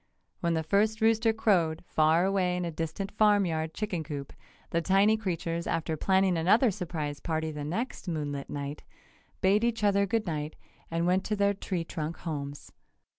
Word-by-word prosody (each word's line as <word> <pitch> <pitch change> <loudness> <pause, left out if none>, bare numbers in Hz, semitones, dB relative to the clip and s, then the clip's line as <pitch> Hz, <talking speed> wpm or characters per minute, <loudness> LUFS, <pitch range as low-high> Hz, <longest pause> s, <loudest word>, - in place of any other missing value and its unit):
When 170 -1 0
the 160 - 0
first 210 +6 +2
rooster 225 0 +3
crowed, 180 -8 +1
far 160 +3 +3
away 185 -2 +1
in 180 - -2
a 170 - -3
distant 165 +5 -4
farm 210 -2 +4
yard 160 -1 -2
chicken 190 -7 -2
coop, 140 -2 -6 0.4
the 170 - +1
tiny 195 +4 +4
creatures, 170 -5 -3
after 160 -1 -1
planning 190 +2 +2
another 215 +8 +4
surprise 160 -6 -4
party 160 -1 -2
the 150 -1 -5
next 190 - -4
moonlit 145 -4 -3
night, 145 0 -5 0.6
bade 200 +3 +3
each 235 -2 0
other 200 -1 +3
good 225 +2 0
night 155 -3 -3 0.3
and 165 +1 0
went 185 +2 +2
to 210 - 0
their 200 0 +2
tree 185 -3 -3
trunk 160 0 -5
homes. 145 -3 -6
175 Hz, 175 wpm, -29 LUFS, 160-200 Hz, 0.6 s, farm